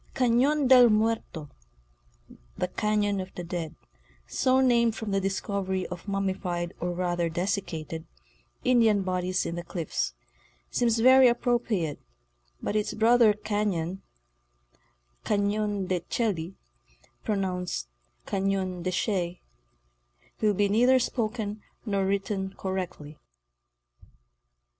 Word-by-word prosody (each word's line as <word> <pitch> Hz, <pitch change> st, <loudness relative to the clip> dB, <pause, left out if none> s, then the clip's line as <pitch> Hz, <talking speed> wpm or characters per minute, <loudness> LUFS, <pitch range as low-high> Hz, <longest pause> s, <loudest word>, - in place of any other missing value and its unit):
Cation 265 Hz, +4 st, +3 dB
del 250 Hz, -2 st, +8 dB
Muerto 215 Hz, -8 st, 0 dB, 1.1 s
"—the 180 Hz, -, 0 dB
Cafion 205 Hz, -1 st, 0 dB
of 185 Hz, 0 st, -8 dB
the 175 Hz, -, -5 dB
Dead—so 160 Hz, -, -3 dB
named 235 Hz, -3 st, +3 dB
from 220 Hz, -2 st, -4 dB
the 195 Hz, 0 st, +1 dB
discovery 190 Hz, -1 st, -2 dB
of 180 Hz, +2 st, -8 dB
mummified 185 Hz, -3 st, -2 dB
or 175 Hz, -, -2 dB
rather 175 Hz, -1 st, -1 dB
dessicated 165 Hz, -3 st, -3 dB, 0.6 s
Indian 225 Hz, -5 st, +4 dB
bodies 185 Hz, 0 st, -1 dB
in 170 Hz, +1 st, -3 dB
its 170 Hz, -, -9 dB
cliffs—seems -, -, -3 dB
very 260 Hz, +1 st, +8 dB
appropriate, 235 Hz, -, 0 dB, 0.6 s
but -, -, -2 dB
its 210 Hz, -1 st, 0 dB
brother 230 Hz, 0 st, +5 dB
cahon—" 200 Hz, -4 st, -2 dB, 1.2 s
Cafion 205 Hz, -1 st, 0 dB
de 185 Hz, -1 st, 0 dB
Chelly," 180 Hz, -2 st, -2 dB, 0.7 s
pronounced 180 Hz, -, -2 dB, 0.4 s
Cafion 190 Hz, -2 st, -1 dB
de 185 Hz, -, -1 dB
Shay, 180 Hz, -2 st, -1 dB, 1.0 s
will 210 Hz, -2 st, +3 dB
be 205 Hz, +2 st, +3 dB
neither 245 Hz, +6 st, +4 dB
spoken 220 Hz, -4 st, -2 dB, 0.2 s
nor 200 Hz, -3 st, 0 dB
written 195 Hz, -1 st, -2 dB
correctly. 180 Hz, -6 st, -5 dB
195 Hz, 100 wpm, -27 LUFS, 175-220 Hz, 1.2 s, del